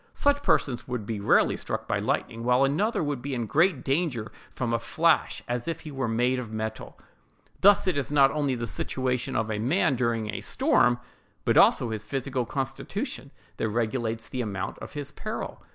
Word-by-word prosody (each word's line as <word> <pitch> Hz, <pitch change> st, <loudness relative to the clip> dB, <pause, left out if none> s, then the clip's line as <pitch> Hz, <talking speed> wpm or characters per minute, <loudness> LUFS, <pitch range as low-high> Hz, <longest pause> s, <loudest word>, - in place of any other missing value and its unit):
Such 285 Hz, 0 st, +3 dB
persons 120 Hz, -, +1 dB
would 125 Hz, -4 st, -3 dB
be 110 Hz, -1 st, -3 dB
rarely 100 Hz, -, +3 dB
struck -, -, -4 dB
by -, -, 0 dB
lightning, 115 Hz, 0 st, -2 dB
while 125 Hz, +2 st, +4 dB
another 165 Hz, +9 st, +1 dB
would 145 Hz, -4 st, -2 dB
be 140 Hz, 0 st, -3 dB
in 120 Hz, -, -1 dB
as -, -, -5 dB
great 160 Hz, -, +2 dB
danger 135 Hz, -6 st, -1 dB, 0.2 s
from 120 Hz, -2 st, -3 dB
a 115 Hz, -, +2 dB
flash 160 Hz, +7 st, +1 dB
as 120 Hz, +2 st, -2 dB
if 165 Hz, -, -3 dB
he 155 Hz, -, -8 dB
were 135 Hz, -3 st, -2 dB
made 120 Hz, +3 st, +1 dB
of 115 Hz, -3 st, -6 dB
metal. 110 Hz, 0 st, -5 dB, 0.6 s
Thus 200 Hz, +1 st, +6 dB
it 180 Hz, -7 st, +1 dB
is 140 Hz, -, -3 dB
not 140 Hz, -2 st, +5 dB
only 145 Hz, -4 st, 0 dB
the 120 Hz, -1 st, -3 dB
situation 125 Hz, +5 st, -2 dB
of 110 Hz, 0 st, 0 dB
a 105 Hz, -, -2 dB
man, 130 Hz, +3 st, +2 dB
during 115 Hz, -3 st, -1 dB
a -, -, -4 dB
storm, 120 Hz, 0 st, +3 dB, 0.5 s
but -, -, +3 dB
also 115 Hz, -, +5 dB
his 110 Hz, -1 st, -3 dB
physical 130 Hz, +1 st, -2 dB
constitution, 135 Hz, 0 st, -4 dB, 0.3 s
that 110 Hz, -, -1 dB
regulates 115 Hz, 0 st, -1 dB
the 130 Hz, -, -3 dB
amount 100 Hz, -5 st, -4 dB
of -, -, -9 dB
his 145 Hz, -1 st, -5 dB
peril. 215 Hz, +6 st, -6 dB
125 Hz, 195 wpm, -27 LUFS, 115-140 Hz, 0.6 s, Thus